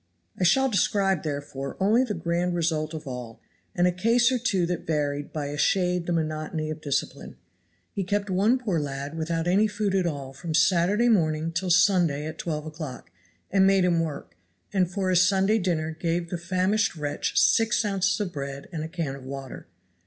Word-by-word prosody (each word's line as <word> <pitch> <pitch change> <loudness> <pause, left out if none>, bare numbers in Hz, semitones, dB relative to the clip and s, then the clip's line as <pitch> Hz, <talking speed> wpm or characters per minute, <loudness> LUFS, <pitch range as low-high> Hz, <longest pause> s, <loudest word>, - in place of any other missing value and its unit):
I - - -3
shall 265 +10 +4
describe 195 -5 +1
therefore 140 -2 -5
only 215 +6 +4
the 220 -5 -3
grand 175 +1 -1
result 160 -2 -1
of 155 - -7
all, 125 -4 -7 0.4
and 175 - +3
a 180 - +4
case 230 +7 +3
or 255 - +1
two 195 -7 +1
that 175 0 -4
varied 145 -2 -1
by 150 -2 -3
a 145 +1 -5
shade 180 -1 +1
the - - -1
monotony 155 -1 -2
of 155 0 -7
discipline. 140 -2 -3 0.6
He 195 - -2
kept 200 +2 -1
one 200 +6 +2
poor 210 -10 -1
lad 140 +1 -5
without 165 0 -2
any 200 +5 +4
food 210 -1 -2
at 185 -2 +2
all 140 -4 -5
from 160 +3 -4
Saturday 185 +7 +3
morning 160 -7 +2
till 180 +2 -2
Sunday 175 -5 +3
at 155 +1 -7
twelve 155 -2 -3
o'clock, 155 - -8 0.4
and 190 0 +4
made 195 -1 +4
him 175 -2 +2
work; 150 - -4 0.4
and 185 -3 +2
for 190 0 -1
his 180 -1 +5
Sunday 195 +3 +2
dinner 165 -4 -1
gave 170 +1 -2
the 175 - -1
famished 185 +4 0
wretch 150 -2 -1
six 225 0 +3
ounces 195 0 +1
of 200 -4 -3
bread 140 -1 -6
and 160 -3 -4
a - - -4
can 160 -6 -3
of 135 - -11
water. 135 0 -8
170 Hz, 190 wpm, -26 LUFS, 155-195 Hz, 0.6 s, his